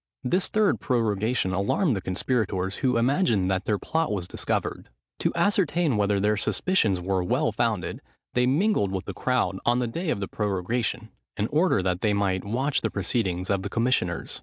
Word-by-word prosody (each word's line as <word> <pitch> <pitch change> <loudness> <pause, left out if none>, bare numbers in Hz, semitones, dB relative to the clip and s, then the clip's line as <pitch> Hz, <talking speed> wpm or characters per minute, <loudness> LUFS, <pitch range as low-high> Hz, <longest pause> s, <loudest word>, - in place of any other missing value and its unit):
This 180 +9 +1
third 215 -2 +2
prorogation 110 -4 0
alarmed 110 - +1
the 95 - -3
conspirators, 95 -1 -1
who 130 -4 +1
imagined 115 - +2
that 95 +1 -1
their 105 - +1
plot 160 +6 -1
was 95 -4 -2
discovered. - - -3 0.3
To - - +1
ascertain 170 - +2
whether 100 -1 +1
their 105 +1 +2
suspicions 105 - +1
were 95 0 -1
well 90 - +1
founded, - - -1 0.3
they 125 0 +2
mingled 145 - +2
with 95 -1 -3
the - - -5
crowd 125 -7 0
on 120 +1 +2
the 125 - 0
day 165 +9 -3
of 100 - -1
prorogation, 110 +3 -2 0.3
in 105 - 0
order 155 - +2
that 90 -1 -1
they 105 -2 +2
might 95 -2 0
watch 130 +7 0
the - - 0
proceedings 95 -6 -1
of 100 -1 +1
the 100 - -4
commissioners. 115 -7 0
110 Hz, 175 wpm, -26 LUFS, 95-130 Hz, 0.3 s, third